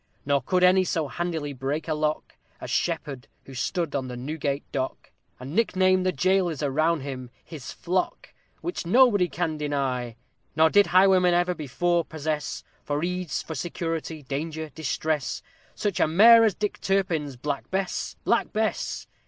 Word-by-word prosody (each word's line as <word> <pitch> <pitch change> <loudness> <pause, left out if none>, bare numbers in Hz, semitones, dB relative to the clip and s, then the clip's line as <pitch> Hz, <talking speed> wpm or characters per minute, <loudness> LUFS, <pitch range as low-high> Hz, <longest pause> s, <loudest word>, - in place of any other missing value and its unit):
_ - - -45 0.2
Nor 140 -1 +2
could 180 +7 +1
any 185 +1 +6
so 165 -4 -1
handily 160 -2 -3
break 135 +5 -3
a 160 - 0
lock 155 0 -2 0.3
As - - -7
SHEPPARD, 145 -6 -2 0.2
who 135 - -11
stood 165 +5 -2
on 135 -2 -1
the 125 -1 -6
Newgate 140 +1 -3
dock, 130 -1 -4 0.3
And 130 +4 -7
nicknamed 185 -3 +2
the - - +3
jailers 180 -1 +1
around 155 +3 +1
him 130 -2 -6 0.2
"his 150 -6 -8
flock!" 180 +2 -2 0.3
Which 350 - -3
nobody 205 -1 +5
can 165 -3 -2
deny. 135 -5 -2 0.4
Nor 160 +1 +5
did 205 0 +5
highwaymen 185 -1 +5
ever 175 +1 +2
before 170 +3 0
possess 155 -1 -4 0.2
For 145 +1 -2
ease, 180 -1 -2
for 160 - -6
security, 165 -1 -4
danger, 155 +3 -4
distress, 155 0 -2 0.3
Such 200 -6 -2
a - - +4
mare 225 +8 +7
as 215 - +2
DICK 210 -1 -3
TURPIN'S 175 -8 0
Black 140 +2 -4
Bess! 190 -1 -2
Black - - +1
Bess! 220 0 -2
160 Hz, 160 wpm, -26 LUFS, 145-180 Hz, 0.4 s, mare